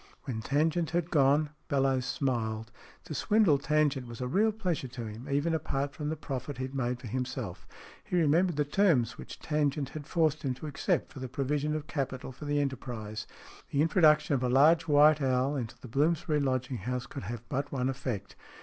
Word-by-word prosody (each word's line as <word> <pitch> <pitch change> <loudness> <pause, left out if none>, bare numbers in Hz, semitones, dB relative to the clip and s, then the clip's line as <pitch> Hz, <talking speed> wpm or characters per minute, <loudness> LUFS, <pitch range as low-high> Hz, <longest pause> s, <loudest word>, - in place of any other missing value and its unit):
When 120 -5 -4
Tangent 155 +6 +1
had 175 +1 -1
gone 145 +1 +3 0.2
Bellowes 135 -3 +1
smiled. 115 -4 -2 0.3
To - - -7
swindle 180 -1 +3
Tangent 145 -3 +1
was 120 -1 -9
a 125 - -2
real 210 +11 +3
pleasure 185 -10 -2
to 120 -1 -7
him, 110 +3 -8
even 145 +4 +1
apart 140 -2 -1
from 150 0 -4
the 160 - -1
profit 140 -2 -5
he 130 0 -2
made 125 -2 -2
for 125 - -11
himself. 120 -5 -4 0.4
He - - -3
remembered 170 +3 +3
the 150 0 +1
terms 145 - +2
which - - -8
Tangent 150 -2 0
had 150 0 -8
forced 155 -3 +1
him 130 -3 -1
to 130 - -9
accept 160 +4 -1
for 140 - -8
the 130 -1 -5
provision 145 +2 -1
of 155 -1 -4
capital 135 -3 -3
for 135 +4 -10
the 145 0 +1
enterprise. 120 -6 -4 0.4
The 145 +1 +2
introduction 155 -3 +4
of 135 - +1
a 125 - +1
large 155 +6 +5
white 150 0 +6
owl 130 +1 +1
into 120 -5 -5
the - - -10
Bloomsbury 155 +5 +1
lodging 130 -2 -1
house 125 +1 -3
could 135 -5 -7
have 115 +2 -6
but 140 +3 -2
one 130 -2 0
effect. 130 -6 -4
140 Hz, 195 wpm, -30 LUFS, 125-155 Hz, 0.4 s, white